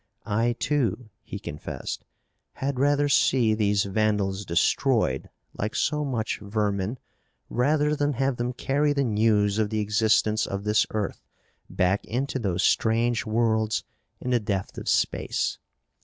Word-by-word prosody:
I, 115 Hz, +2 st, +1 dB
too," 120 Hz, -4 st, -1 dB
he 105 Hz, -, -7 dB
confessed, 75 Hz, -7 st, -6 dB, 0.5 s
"had 135 Hz, -1 st, -3 dB
rather 145 Hz, +1 st, +3 dB
see 125 Hz, -4 st, +3 dB
these 105 Hz, -2 st, +2 dB
vandals 100 Hz, -1 st, 0 dB
destroyed 85 Hz, -, +1 dB, 0.3 s
like 105 Hz, +2 st, -3 dB
so 150 Hz, -1 st, +1 dB
much 120 Hz, -6 st, -2 dB
vermin 100 Hz, +1 st, -1 dB, 0.5 s
rather 150 Hz, +4 st, +2 dB
than 145 Hz, 0 st, 0 dB
have 135 Hz, 0 st, 0 dB
them 120 Hz, +1 st, -1 dB
carry 145 Hz, +4 st, +1 dB
the 140 Hz, -1 st, +1 dB
news 105 Hz, -2 st, +2 dB
of 105 Hz, -1 st, +1 dB
the 110 Hz, -, -2 dB
existence 110 Hz, 0 st, +2 dB
of 100 Hz, 0 st, -4 dB
this 105 Hz, 0 st, +2 dB
earth 105 Hz, -2 st, -3 dB, 0.5 s
back 90 Hz, +2 st, +1 dB
into 130 Hz, +3 st, -2 dB
those 95 Hz, -5 st, -1 dB
strange 115 Hz, +1 st, +2 dB
worlds 110 Hz, -1 st, +1 dB, 0.4 s
in 125 Hz, -, -3 dB
the 120 Hz, -, +3 dB
depth 100 Hz, -3 st, -3 dB
of -, -, -4 dB
space. -, -, 0 dB
110 Hz, 140 wpm, -26 LUFS, 105-130 Hz, 0.5 s, rather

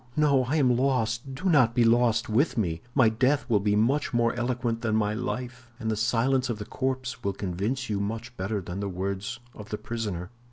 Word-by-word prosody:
No, 140 Hz, -4 st, +4 dB
I 140 Hz, +5 st, -1 dB
am 130 Hz, -5 st, +4 dB
lost; 125 Hz, 0 st, 0 dB
do 165 Hz, +8 st, -3 dB
not 130 Hz, -9 st, +4 dB
be 120 Hz, -, +4 dB
lost 115 Hz, 0 st, +3 dB
with 120 Hz, +6 st, +1 dB
me. 85 Hz, -6 st, -1 dB
My 130 Hz, -5 st, +6 dB
death 130 Hz, +6 st, +1 dB
will 110 Hz, -5 st, +3 dB
be 105 Hz, +1 st, +1 dB
much 125 Hz, +5 st, +1 dB
more 115 Hz, -1 st, +3 dB
eloquent 120 Hz, -1 st, -1 dB
than 110 Hz, -2 st, 0 dB
my 105 Hz, -1 st, +1 dB
life, 125 Hz, +2 st, -5 dB
and 110 Hz, -2 st, -1 dB
the -, -, 0 dB
silence 120 Hz, +4 st, +1 dB
of 115 Hz, -, -2 dB
the 105 Hz, -, -6 dB
corpse 130 Hz, +2 st, -3 dB
will 100 Hz, -, 0 dB
convince 100 Hz, +8 st, -2 dB
you 105 Hz, -2 st, -1 dB
much 115 Hz, +4 st, -4 dB
better 100 Hz, +2 st, -2 dB
than 90 Hz, +1 st, -6 dB
the 100 Hz, 0 st, -2 dB
words 100 Hz, +5 st, -3 dB
of 105 Hz, -1 st, -11 dB
the 105 Hz, -, -3 dB
prisoner." 105 Hz, -6 st, -4 dB
115 Hz, 210 wpm, -27 LUFS, 105-130 Hz, -, My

